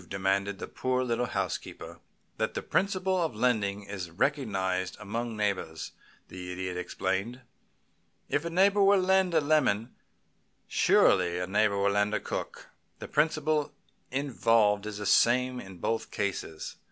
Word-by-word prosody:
demanded 100 Hz, +1 st, 0 dB
the -, -, -6 dB
poor 130 Hz, 0 st, -1 dB
little 125 Hz, 0 st, -1 dB
housekeeper. -, -, -4 dB, 0.4 s
"That -, -, -1 dB
the -, -, -3 dB
principle 190 Hz, -1 st, 0 dB
of 160 Hz, -9 st, -1 dB
lending 105 Hz, -4 st, 0 dB
is 100 Hz, -3 st, -6 dB
recognized 95 Hz, -, -1 dB
among 115 Hz, +2 st, -4 dB
neighbors," 95 Hz, -6 st, -2 dB, 0.4 s
the 90 Hz, 0 st, -7 dB
Idiot 90 Hz, 0 st, -4 dB
explained. 95 Hz, +6 st, -3 dB, 0.9 s
"If 145 Hz, -, 0 dB
a 170 Hz, -, -3 dB
neighbor 195 Hz, +4 st, +3 dB
will 200 Hz, 0 st, +6 dB
lend 185 Hz, -1 st, +2 dB
a 160 Hz, -, +5 dB
lemon, 130 Hz, -7 st, +1 dB, 0.7 s
surely 90 Hz, -2 st, +3 dB
a 90 Hz, -, -1 dB
neighbor 100 Hz, +1 st, +2 dB
will 100 Hz, 0 st, +2 dB
lend 105 Hz, +1 st, +1 dB
a -, -, 0 dB
cook. -, -, -6 dB, 0.3 s
The -, -, -8 dB
principle 155 Hz, -1 st, +1 dB, 0.4 s
involved 115 Hz, -6 st, +2 dB
is 105 Hz, -1 st, -5 dB
the 105 Hz, -, -5 dB
same 125 Hz, +4 st, +3 dB
in 95 Hz, -5 st, -10 dB
both 115 Hz, +6 st, -2 dB
cases. 100 Hz, -5 st, -4 dB
110 Hz, 140 wpm, -29 LUFS, 95-140 Hz, 0.9 s, will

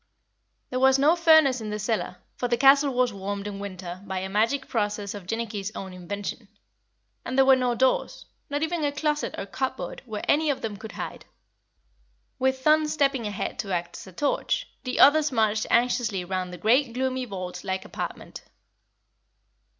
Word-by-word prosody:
There 255 Hz, -, -1 dB
was 265 Hz, 0 st, +5 dB
no 295 Hz, +5 st, +4 dB
furnace 315 Hz, -7 st, +5 dB
in 215 Hz, -, -5 dB
the 210 Hz, -, -3 dB
cellar, 215 Hz, -3 st, -2 dB, 0.2 s
for 245 Hz, -, -2 dB
the 240 Hz, 0 st, +1 dB
castle 275 Hz, +1 st, +6 dB
was 250 Hz, -2 st, +1 dB
warmed 200 Hz, +1 st, -4 dB
in 205 Hz, -1 st, -5 dB
winter 185 Hz, -2 st, -7 dB
by 190 Hz, -2 st, -4 dB
a 190 Hz, +1 st, -3 dB
magic 230 Hz, +7 st, +1 dB
process 205 Hz, -3 st, -2 dB
of 200 Hz, -4 st, -9 dB
Jinnicky's 215 Hz, -2 st, -3 dB
own 190 Hz, -1 st, -6 dB
invention; 200 Hz, +4 st, -6 dB, 0.8 s
and 260 Hz, -, -4 dB
there 270 Hz, -, +6 dB
were 265 Hz, 0 st, +7 dB
no 250 Hz, -2 st, 0 dB
doors, 260 Hz, +2 st, 0 dB, 0.2 s
not 290 Hz, +2 st, -1 dB
even 320 Hz, 0 st, -1 dB
a 290 Hz, -, +1 dB
closet 300 Hz, +1 st, -1 dB
or -, -, -4 dB
cupboard 260 Hz, +5 st, -4 dB
where 215 Hz, -2 st, -5 dB
any 305 Hz, +1 st, +3 dB
of 280 Hz, -, -1 dB
them 220 Hz, -2 st, -3 dB
could 215 Hz, +2 st, -9 dB
hide. -, -, -6 dB, 1.1 s
With 265 Hz, 0 st, +2 dB
Thun 305 Hz, +2 st, +4 dB
stepping 275 Hz, -6 st, +1 dB
ahead 205 Hz, -1 st, -4 dB
to 200 Hz, -4 st, -3 dB
act 175 Hz, -1 st, -3 dB
as -, -, -9 dB
a -, -, -10 dB
torch, 290 Hz, -, -1 dB, 0.2 s
the 255 Hz, -, -2 dB
others 300 Hz, +1 st, +6 dB
marched 220 Hz, -3 st, +1 dB
anxiously 235 Hz, -6 st, +1 dB
round 185 Hz, 0 st, -3 dB
the 180 Hz, -, -7 dB
great 235 Hz, +4 st, +2 dB
gloomy 260 Hz, 0 st, -1 dB
vault 185 Hz, -4 st, -6 dB
like 190 Hz, -1 st, -3 dB
apartment. -, -, -6 dB
235 Hz, 180 wpm, -26 LUFS, 200-270 Hz, 1.1 s, were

